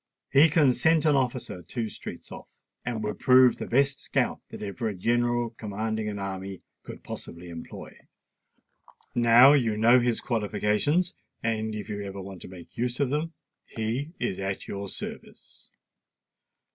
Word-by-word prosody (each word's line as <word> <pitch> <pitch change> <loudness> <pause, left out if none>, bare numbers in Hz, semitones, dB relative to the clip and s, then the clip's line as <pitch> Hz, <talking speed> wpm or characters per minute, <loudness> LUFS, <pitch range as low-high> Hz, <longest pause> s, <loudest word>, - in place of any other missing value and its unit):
He 150 +4 +7
can 145 -4 +4
scent 160 +3 +3
an 150 -2 +4
officer 125 -8 -1
two 115 +7 -4
streets - - -9
off, - - -9 0.4
and 115 -3 -3
would 105 0 -3
prove 130 -1 +6
the - - -4
best 140 +3 +2
scout - - -1
that - - -8
ever 105 +3 -3
a 105 - -5
general 120 +3 +1
commanding 110 0 -3
an 105 - -5
army 95 -1 -5 0.2
could - - -10
possibly 85 +1 -8
employ. 85 -1 -9 1.2
Now 120 +3 +7
you 115 -7 +2
know 120 +3 +6
his 120 -1 +1
qualifications; 120 - 0 0.3
and 110 -1 -1
if 105 -1 -6
you 105 -2 -4
ever 100 -1 -6
want 95 -1 -8
to - - -9
make 90 -2 -13
use 120 +1 -2
of 140 -3 +1
them, 155 +3 -1 0.3
he 120 +8 -3
is 120 -6 -2
at 95 0 -3
your 100 0 -5
service." - - -10
115 Hz, 160 wpm, -27 LUFS, 100-130 Hz, 1.2 s, He